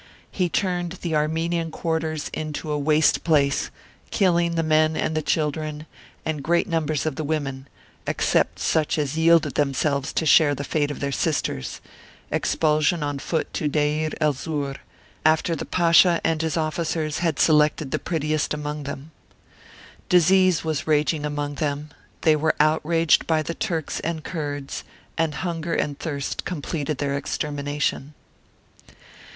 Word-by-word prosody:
He 180 -2 0
turned 175 -2 -1
the 170 -2 -2
Armenian 165 +2 0
quarters 160 -2 -2
into 155 0 -4
a 150 - 0
waste 150 +1 +3
place, 140 -4 +2 0.4
killing 170 -4 +2
the 165 - +1
men 155 0 +3
and 155 - -1
the 155 - +1
children, 150 0 -1 0.4
and 155 -2 -2
great 170 +5 +2
numbers 160 -5 -1
of 155 -4 -2
the 155 - -2
women, 140 -3 -3 0.4
except - - +1
such 160 -1 +1
as 145 -1 -1
yielded 160 -2 +4
themselves 140 0 0
to 160 - 0
share 150 -1 +5
the 140 - -5
fate 145 0 0
of 145 - -6
their 140 0 -1
sisters 140 - -2 0.5
expulsion 155 +1 +1
on 145 -1 -2
foot 160 +4 -2
to 155 - -1
Deir 150 +1 +1
el 150 -2 +3
Zur, 140 0 -3 0.5
after 160 +2 +3
the - - -5
Pasha 170 0 +5
and 160 -1 +1
his 160 0 -1
officers 155 -1 -1
had 165 -4 0
selected 150 -2 +3
the - - 0
prettiest 155 -2 -1
amongst 150 0 -5
them. 140 +2 -7 1.0
Disease 185 0 +4
was 160 -2 -2
raging 150 0 +1
among 145 0 -3
them; 145 0 -2 0.3
they 155 -2 +4
were 155 +1 +1
outraged 160 +2 +3
by 160 -1 +2
the 170 - -3
Turks 170 -7 -2
and 160 -1 -3
Kurds; 145 -5 -4 0.3
and 160 -3 0
hunger 165 -1 -2
and 145 -1 -2
thirst 140 -4 -3
completed 150 -3 -3
their 140 0 -1
extermination. 145 0 -2
155 Hz, 145 wpm, -24 LUFS, 145-165 Hz, 1.0 s, share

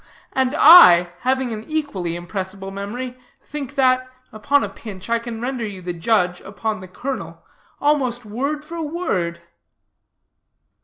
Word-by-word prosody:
And 265 +1 +1
I, 180 - +9
having 260 -1 0
an 215 0 -6
equally 250 - -3
impressible 190 +2 -6
memory, 245 +6 -6 0.2
think 290 -2 -7
that, 255 -1 +2 0.2
upon 280 +7 +1
a - - -1
pinch, 195 -2 -9
I 235 - +3
can 230 -1 -7
render 250 0 -3
you 205 -3 -5
the 175 0 -3
judge 180 0 +1
upon 215 +2 -4
the 185 - -10
colonel 260 +8 -6 0.3
almost 260 -5 +1
word 280 +8 -3
for 335 +1 -6
word." 185 - -2
235 Hz, 140 wpm, -21 LUFS, 195-270 Hz, 0.3 s, I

